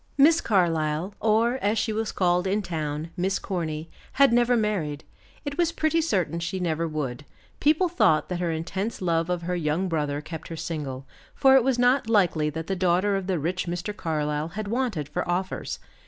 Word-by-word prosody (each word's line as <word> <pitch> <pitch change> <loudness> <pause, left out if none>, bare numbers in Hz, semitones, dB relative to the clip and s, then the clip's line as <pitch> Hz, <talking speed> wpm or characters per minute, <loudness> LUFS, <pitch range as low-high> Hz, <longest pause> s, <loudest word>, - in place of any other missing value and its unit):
Miss 315 +4 +6
Carlyle, 165 -2 +1
or, 225 +4 +2
as 210 +2 +1
she 220 0 0
was 220 0 -2
called 180 0 +1
in 205 +2 0
town, 155 -2 -3
Miss 190 +1 0
Corny, 160 -4 -3 0.3
had 275 -3 +5
never 240 0 +4
married; 175 -9 -1 0.4
it 285 +3 -4
was 340 -1 +3
pretty 330 0 +1
certain 180 - 0
she 170 +3 -3
never 165 -2 -1
would; 145 -4 -4 0.4
people 310 +5 +3
thought 215 - +3
that 180 -1 -3
her 175 -1 0
intense 190 +7 -3
love 165 -2 0
of 175 -1 -1
her 180 +1 -1
young 165 +2 0
brother 150 -4 -1
kept 160 +1 -8
her 165 - -7
single, 145 -5 -4 0.3
for 270 -1 +5
it 265 -2 +6
was 260 -1 +1
not 245 -1 +3
likely 175 -8 +3
that 160 +2 -5
the 195 - -2
daughter 185 +2 +2
of 195 -1 -3
the 185 -2 +1
rich 175 +4 -2
Mr. 175 +4 -3
Carlyle 150 -3 -1
had 205 +5 -5
wanted 230 - -1
for 175 +5 -2
offers. 185 +2 -2
180 Hz, 190 wpm, -26 LUFS, 160-215 Hz, 0.4 s, Miss